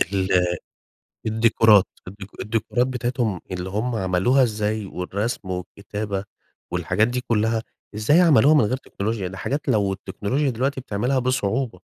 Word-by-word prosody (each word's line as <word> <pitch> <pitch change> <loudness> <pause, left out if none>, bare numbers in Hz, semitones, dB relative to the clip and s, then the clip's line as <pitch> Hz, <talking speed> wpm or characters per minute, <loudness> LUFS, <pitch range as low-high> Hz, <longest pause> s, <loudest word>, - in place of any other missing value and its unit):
ال 95 -2 +1 0.7
الديكورات، 110 -2 +5 0.2
الديكو 100 0 -11
الديكورات 115 +3 0
بتاعتهم 120 -6 -2
اللي 90 0 -4
هم 115 +4 -1
عملوها 95 +7 +2
إزاي 110 -2 -1
والرسم، 100 +3 -4
والكتابة، 100 +2 -4 0.5
والحاجات 90 +6 +1
دي 125 +1 -2
كلها، 110 -1 0 0.3
إزاي 130 +11 +4
عملوها 150 -4 +6
من 150 - +6
غير 125 +5 0
تكنولوجيا، 105 -5 -4
دي 95 - -9
حاجات 140 +9 -3
لو 105 -6 +2
التكنولوجيا 100 +9 -2
دلوقتي 130 +3 -1
بتعملها 125 +2 -1
بصعوبة. 125 -4 -1
110 Hz, 130 wpm, -23 LUFS, 100-125 Hz, 0.7 s, عملوها